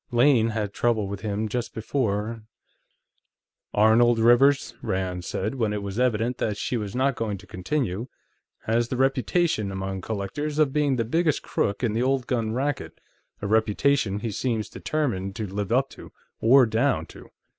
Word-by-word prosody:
Lane 120 -2 +4
had 110 -2 -2
some - - -30
trouble 110 -4 +2
with 100 0 -6
him, 105 +1 -2
just 120 +2 -4
before 110 -1 -2 0.7
..." - - -54
"Arnold 115 +3 +5
Rivers," 120 +5 +4
Rand 95 -3 -2
said, 105 +5 -2
when 115 -5 -1
it 105 -1 -3
was 100 +3 -4
evident 120 0 +1
that 105 -2 -1
she 125 - -2
was 105 -3 -4
not 135 +2 +2
going 105 -3 -2
to - - -14
continue, 115 +1 -2 0.6
"has 115 +1 +1
the 125 - -3
reputation, 135 - +1
among 95 0 -4
collectors, 110 +10 -4
of 150 -3 +3
being 145 -3 +2
the 115 -2 0
biggest 160 +5 +1
crook 100 +5 -1
in 115 -3 +1
the 115 - 0
old 130 0 +1
gun 115 -4 -1
racket, 140 +5 -3 0.4
a - - -1
reputation 110 0 +1
he 115 - -3
seems 110 0 -2
determined 105 -11 -2
to 110 - -3
live 100 +1 -4
up 130 +3 +1 0.5
or 130 +3 +6
down 110 0 +1
to. - - -14
115 Hz, 170 wpm, -25 LUFS, 105-130 Hz, 0.7 s, or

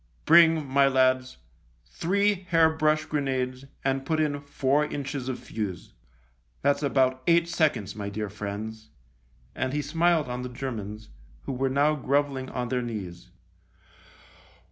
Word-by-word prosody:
Bring, 165 -2 +6
my 135 +1 +4
lads, 130 -1 +2 0.5
three 190 - 0
hair 165 -2 +5
brush 155 0 +1
grenades 130 -3 -2 0.2
and 135 0 0
put 155 +3 -1
in 145 -2 0
four 140 0 +1
inches 140 -3 -4
of 130 - -3
fuse. 100 -5 -6 0.7
That's 140 +1 +2
about 130 -2 +2
eight 170 0 +4
seconds, 145 - 0
my 100 -1 -4
dear 105 +1 -4
friends," 105 +2 -6 0.6
and 130 0 -2
he 150 - 0
smiled 165 +1 +2
on 125 0 -4
the 125 - -5
Germans, 110 -4 -6 0.3
who - - -4
were 135 +1 0
now 145 +3 +3
grovelling 140 -2 -1
on 125 -1 -3
their 125 -1 0
knees. 100 -8 -6
135 Hz, 140 wpm, -26 LUFS, 125-150 Hz, 0.7 s, Bring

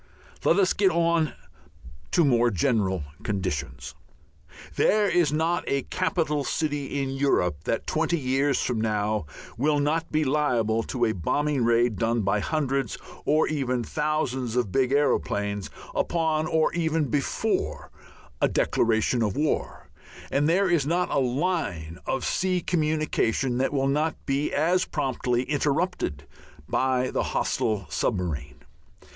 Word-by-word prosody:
Let 170 - +4
us 190 -2 +3
get 195 -1 +3
on 170 -3 +1 0.8
to 170 - +3
more 120 -3 +4
general 95 - 0 0.2
conditions. 90 -9 -3 0.8
There 210 0 +3
is 175 -6 +2
not 160 +3 0
a 140 0 0
capital 160 -5 -1
city 145 -2 -2
in 135 - -3
Europe 90 - 0
that 115 - -1
twenty 165 +2 0
years 135 0 +1
from 120 -3 -1
now 105 -4 -1 0.3
will 145 +2 +2
not 155 +3 0
be 155 0 +2
liable 125 -6 +1
to 120 -2 0
a 110 - +1
bombing 140 - 0
raid 115 -2 +2
done 115 0 +1
by 100 +1 +1
hundreds 135 -2 -1 0.3
or 155 +2 +3
even 130 -5 -1
thousands 135 -4 -1
of 120 -6 0
big 130 +2 +2
aeroplanes, 105 -8 0 0.2
upon 160 -2 0
or 160 0 +2
even 160 -2 +1
before 140 +2 -1 0.5
a - - +5
declaration 115 +1 +1
of 105 -4 0
war, 150 +1 -1 0.4
and 145 +2 +2
there 190 +4 +3
is 170 -5 +2
not 175 +5 0
a - - +2
line 125 - -1
of 135 - -1
sea 185 -1 +1
communication 155 -7 0
that 135 - +1
will 135 -1 +1
not 150 +3 +1
be 140 +1 0
as 175 +5 +2
promptly 125 -4 -1
interrupted 145 - -1 0.4
by 130 -1 +1
the - - 0 0.2
hostile 105 -4 0
submarine. 75 -6 -2
135 Hz, 135 wpm, -26 LUFS, 115-155 Hz, 0.8 s, a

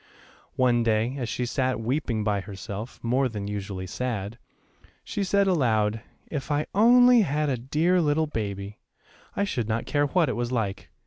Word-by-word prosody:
One 125 -2 +3
day, 115 +2 +1
as 120 -3 -3
she 125 - -2
sat 130 0 -1
weeping 115 -2 -1
by 105 -2 0
herself, 100 +3 -7
more 130 +3 +1
than 105 -3 -5
usually 100 -2 -4
sad, 115 +1 -4 0.6
she 205 - -3
said 200 +1 +2
aloud, 115 - +1 0.2
"If 145 -2 -5
I 145 +1 +1
only 245 +3 +6
had 150 -4 0
a 135 - +1
dear 155 +9 +1
little 155 0 +2
baby, 100 -6 -5 0.6
I 200 - +1
should 120 - -2
not 115 +1 -1
care 145 0 +1
what 170 +2 +2
it 125 - -1
was 120 0 -2
like. 105 -5 -2
125 Hz, 170 wpm, -26 LUFS, 110-150 Hz, 0.6 s, only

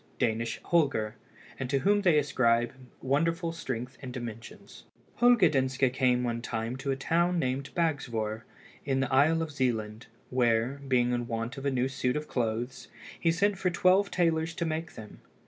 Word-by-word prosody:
Danish 115 +1 -1
Holger, 140 -10 +1 0.5
and 130 -2 -3
to 140 - +2
whom 205 +8 +2
they 175 -6 +4
ascribe 120 -5 +2 0.3
wonderful 165 +5 +1
strength 130 -5 -5
and 130 -2 -6
dimensions. 115 -2 -9 0.3
Holger 240 -6 +6
Danske 130 -3 +1
came 125 -2 +2
one 115 -1 -2
time 115 +1 -3
to 140 +1 -5
a 135 - +1
town 170 +6 +1
named 130 -2 -1
Bagsvoer, 115 -10 -1 0.4
in 135 -1 0
the 135 0 -1
isle 160 +5 +4
of 160 - -6
Zealand, 115 -5 -2 0.2
where, 125 +2 +1
being 125 -2 +2
in 120 -1 -1
want 115 +2 -3
of 140 - -3
a - - +3
new 130 0 +1
suit 135 -1 -1
of 150 0 -3
clothes, 120 +1 -3 0.3
he 165 - +2
sent 200 +3 +1
for 185 - +1
twelve 185 +3 +3
tailors 165 -1 0
to 170 - -2
make 160 +1 -3
them. 110 -1 -11
135 Hz, 170 wpm, -29 LUFS, 120-165 Hz, 0.5 s, Holger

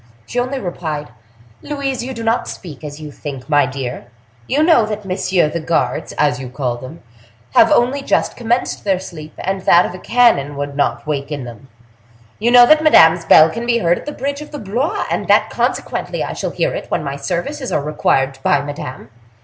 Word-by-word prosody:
She 245 - -3
only 255 +2 -2
replied: 155 - -5 0.5
"Louise, 275 -4 -3
you 260 +1 -6
do 230 - -6
not 225 +1 0
speak 155 -6 -9
as 145 0 -7
you 150 -1 -8
think, 140 -3 -8
my 145 -3 +3
dear; 130 -2 -6 0.4
you 295 +3 +2
know 320 -8 +5
that 210 -1 -4
messieurs 185 -4 0
the 170 - -1
guards, 165 +1 -1
as 145 -4 +1
you 130 -2 -7
call 125 -2 -3
them, 130 +5 -11 0.5
have - - +6
only 255 +4 +2
just - - 0
commenced 240 +1 -1
their 195 -2 +1
sleep, 155 -4 -10
and 190 0 -3
that 175 +1 +4
a 185 - -8
cannon 200 - +2
would 145 0 -4
not 145 - -1
waken 145 -1 -3
them; 120 +1 -11 0.7
you 225 +3 +2
know 245 0 +8
that 310 +4 +5
Madame's 165 - +6
bell 160 0 +7
can 235 +1 -5
be 235 -1 +3
heard 175 -6 +1
at - - -13
the - - -2
bridge 280 0 -4
of 300 - -9
Blois, 240 - -1
and - - -2
that - - +3
consequently - - -2
I - - -4
shall - - -3
hear - - -1
it - - -6
when - - -1
my 140 -1 -4
services 220 - -4
are 145 - 0
required 135 -3 0
by 145 - +3
Madame. 145 -4 -7
170 Hz, 200 wpm, -18 LUFS, 145-240 Hz, 0.7 s, know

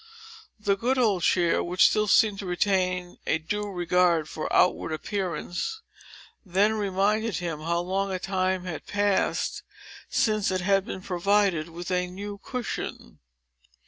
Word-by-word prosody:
The 205 -1 +1
good 245 +6 0
old 210 -8 +2
chair, 175 -1 +2
which 180 +1 +4
still 215 0 +1
seemed 205 -1 +4
to 195 - -5
retain 180 -1 0
a - - +2
due 210 +6 -3
regard 175 -3 +2
for 155 - -5
outward 180 - +3
appearance, 190 - -3 0.6
then 200 +2 +2
reminded 210 +1 0
him 170 -4 -3
how 170 +2 -1
long 195 +2 -1
a 185 - -1
time 185 -1 -1
had 175 -4 -6
passed, 205 -1 0 0.5
since 215 -2 +1
it 185 -1 -1
had 195 +1 +2
been 190 - -6
provided 185 -3 +1
with 175 +2 -7
a 180 0 +1
new 200 +3 -7
cushion. 250 -2 -5
190 Hz, 145 wpm, -26 LUFS, 175-205 Hz, 0.6 s, which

